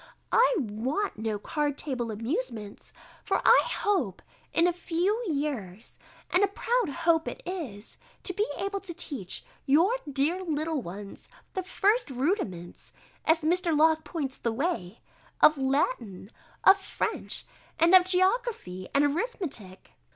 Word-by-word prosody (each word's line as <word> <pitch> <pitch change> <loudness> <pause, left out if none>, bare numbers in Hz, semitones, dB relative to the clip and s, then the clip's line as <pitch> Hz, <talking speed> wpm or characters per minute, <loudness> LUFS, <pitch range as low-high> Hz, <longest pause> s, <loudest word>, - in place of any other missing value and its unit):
I - - +5
want 255 - -2
no 220 -1 -1
card 290 +6 -2
table 250 -6 -3
amusements; 225 - -4 0.3
for - - +1
I - - +8
hope, 325 - -1 0.3
in 335 - +3
a 355 - +2
few 360 +6 -1
years 250 - -4 0.3
(and 365 - +4
a - - +5
proud 460 +1 0
hope 330 +1 +1
it - - -6
is), 270 - -6 0.3
to 370 - -2
be 415 +4 0
able 395 0 -2
to 370 -4 -9
teach 245 - -3 0.2
your 335 - +4 0.2
dear 305 +7 0
little 310 -3 -1
ones 195 +1 -9 0.2
the 375 - -1
first 410 +5 +1
rudiments, 250 - -3 0.3
as 320 0 +3
Mr. 340 0 +2
Locke 315 +1 +4
points 295 -4 -4
the 235 - -1
way, 230 - -2 0.4
of 305 - +7
Latin, 265 - -1 0.3
of 390 +1 +7
French, 390 - -2 0.3
and 335 +2 +4
of 370 -1 +8
geography, 370 - 0
and 285 +1 +5
arithmetic. 290 - -3
310 Hz, 135 wpm, -28 LUFS, 235-370 Hz, 0.4 s, I